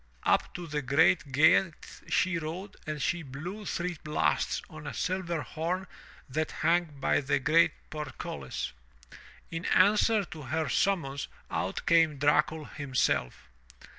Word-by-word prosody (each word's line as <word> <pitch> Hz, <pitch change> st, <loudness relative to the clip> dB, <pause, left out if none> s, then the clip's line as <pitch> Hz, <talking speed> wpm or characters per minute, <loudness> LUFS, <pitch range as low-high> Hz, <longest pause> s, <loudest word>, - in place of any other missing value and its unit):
Up -, -, +2 dB
to 175 Hz, -, -5 dB
the 150 Hz, -2 st, -2 dB
great 140 Hz, +2 st, +3 dB
gate 160 Hz, +4 st, +3 dB
she 185 Hz, -2 st, +2 dB
rode 175 Hz, +5 st, -6 dB
and 155 Hz, -1 st, -3 dB
she 175 Hz, +5 st, 0 dB
blew 165 Hz, +9 st, -7 dB
three 175 Hz, -2 st, -3 dB
blasts 150 Hz, 0 st, +1 dB
on 80 Hz, -, -10 dB
a -, -, -5 dB
silver 175 Hz, -4 st, -1 dB
horn 175 Hz, +4 st, -3 dB, 0.4 s
that 155 Hz, +4 st, -2 dB
hung 175 Hz, +1 st, +4 dB
by -, -, +2 dB
the 140 Hz, 0 st, +1 dB
great 155 Hz, +5 st, +4 dB, 0.2 s
portcullis. 150 Hz, -, -5 dB, 0.8 s
In 165 Hz, +1 st, -4 dB
answer 210 Hz, +3 st, +4 dB
to 160 Hz, -2 st, -9 dB
her 155 Hz, +4 st, -2 dB
summons 140 Hz, -8 st, 0 dB, 0.2 s
out -, -, -2 dB
came 165 Hz, -3 st, +4 dB
Dracul 150 Hz, +2 st, +2 dB
himself. 130 Hz, -, -1 dB
160 Hz, 135 wpm, -29 LUFS, 145-175 Hz, 0.8 s, hung